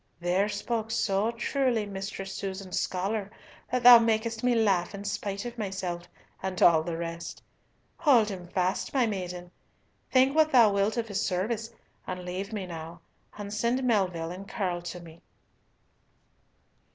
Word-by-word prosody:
"There 180 Hz, +4 st, +1 dB
spoke 220 Hz, +2 st, -2 dB
so 210 Hz, -2 st, +1 dB
truly 235 Hz, -1 st, 0 dB
Mistress 195 Hz, -1 st, -6 dB
Susan's 190 Hz, -1 st, -4 dB
scholar 195 Hz, +2 st, -2 dB, 0.4 s
that 250 Hz, 0 st, 0 dB
thou 240 Hz, -1 st, +11 dB
makest 225 Hz, 0 st, 0 dB
me 245 Hz, -1 st, +3 dB
laugh 200 Hz, -4 st, +2 dB
in 200 Hz, -, -7 dB
spite 200 Hz, 0 st, -3 dB
of 240 Hz, -1 st, -6 dB
myself 185 Hz, -4 st, -4 dB, 0.3 s
and 190 Hz, -1 st, -3 dB
all 165 Hz, -2 st, +6 dB
the 165 Hz, 0 st, -4 dB
rest. 170 Hz, 0 st, -6 dB, 0.5 s
Hold 245 Hz, -9 st, +4 dB
him 180 Hz, -3 st, -7 dB
fast, 185 Hz, +7 st, -1 dB
my 255 Hz, -3 st, +4 dB
maiden; 180 Hz, -4 st, -4 dB, 0.6 s
think 260 Hz, +2 st, +4 dB
what 315 Hz, -1 st, +4 dB
thou 230 Hz, -5 st, +6 dB
wilt 200 Hz, +3 st, +1 dB
of 230 Hz, -1 st, -1 dB
his 205 Hz, 0 st, -1 dB
service, 215 Hz, +5 st, -1 dB, 0.4 s
and 180 Hz, -1 st, -5 dB
leave 185 Hz, +4 st, -4 dB
me 205 Hz, -3 st, -3 dB
now, 165 Hz, -1 st, -8 dB, 0.4 s
and 205 Hz, -1 st, -6 dB
send 235 Hz, +5 st, 0 dB
Melville 185 Hz, -8 st, +1 dB
and 190 Hz, +2 st, -8 dB
Curll 180 Hz, -4 st, -2 dB
to 175 Hz, +1 st, -6 dB
me." 170 Hz, -1 st, -14 dB
200 Hz, 150 wpm, -28 LUFS, 180-225 Hz, 0.6 s, thou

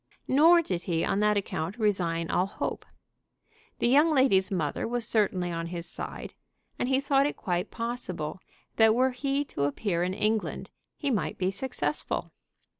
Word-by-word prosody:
Nor 330 Hz, +5 st, +6 dB
did 180 Hz, -, -2 dB
he 165 Hz, -1 st, +1 dB
on 195 Hz, -, 0 dB
that 210 Hz, 0 st, +3 dB
account 190 Hz, 0 st, -3 dB
resign 175 Hz, -7 st, 0 dB
all 180 Hz, +2 st, +2 dB
hope. -, -, -4 dB, 0.9 s
The -, -, +1 dB
young 290 Hz, +6 st, +5 dB
lady's 260 Hz, -11 st, +4 dB
mother 160 Hz, -3 st, -1 dB
was 240 Hz, -1 st, -1 dB
certainly 185 Hz, -5 st, +1 dB
on 165 Hz, 0 st, -3 dB
his 170 Hz, 0 st, -5 dB
side, -, -, -7 dB, 0.5 s
and 245 Hz, -, 0 dB
he 265 Hz, 0 st, +3 dB
thought 275 Hz, 0 st, +3 dB
it -, -, -5 dB
quite 180 Hz, +1 st, -2 dB
possible 230 Hz, -9 st, -4 dB, 0.4 s
that 220 Hz, -1 st, +6 dB
were 260 Hz, +2 st, +3 dB
he 275 Hz, +3 st, -1 dB
to 140 Hz, -, -2 dB
appear 170 Hz, +5 st, -1 dB
in 180 Hz, +1 st, -1 dB
England 215 Hz, +1 st, -1 dB, 0.3 s
he 285 Hz, -3 st, -1 dB
might 165 Hz, -10 st, -1 dB
be 185 Hz, 0 st, 0 dB
successful. 260 Hz, +7 st, -3 dB
210 Hz, 165 wpm, -28 LUFS, 175-260 Hz, 0.9 s, Nor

